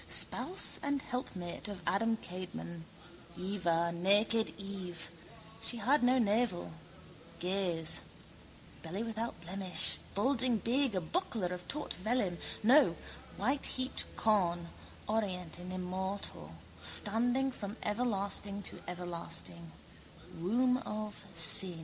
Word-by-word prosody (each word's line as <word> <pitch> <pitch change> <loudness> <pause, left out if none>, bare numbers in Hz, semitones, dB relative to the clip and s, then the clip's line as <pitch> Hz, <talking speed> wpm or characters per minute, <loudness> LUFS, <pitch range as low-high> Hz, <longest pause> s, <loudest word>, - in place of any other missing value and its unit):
Spouse 370 - +2
and 285 -1 0
helpmate 210 -11 -4
of 200 -4 -6
Adam 225 +3 +2
Kadmon: 175 -3 -7 0.5
Heva, 170 -3 0
naked 205 +6 +3
Eve. 185 -4 -6 0.5
She 240 - +2
had 265 +7 +3
no 250 +1 +5
navel. 220 -4 +1 0.7
Gaze. 180 -3 +1 0.8
Belly 185 +7 -3
without 225 0 -3
blemish, 185 +1 +2 0.2
bulging 250 +2 +3
big, 245 +1 +1
a 185 - +1
buckler 225 - -1
of 180 0 -7
taut 300 +1 -2
vellum, 200 -3 0 0.2
no, 265 +7 +6 0.4
whiteheaped 265 -1 0
corn, 175 -6 +2 0.4
orient 185 -6 -1
and 180 +1 -7
immortal, 185 - -3 0.3
standing 245 +5 +3
from 210 -2 -6
everlasting 205 -2 0
to - - -6
everlasting. 95 - -4
200 Hz, 95 wpm, -34 LUFS, 180-230 Hz, 0.8 s, no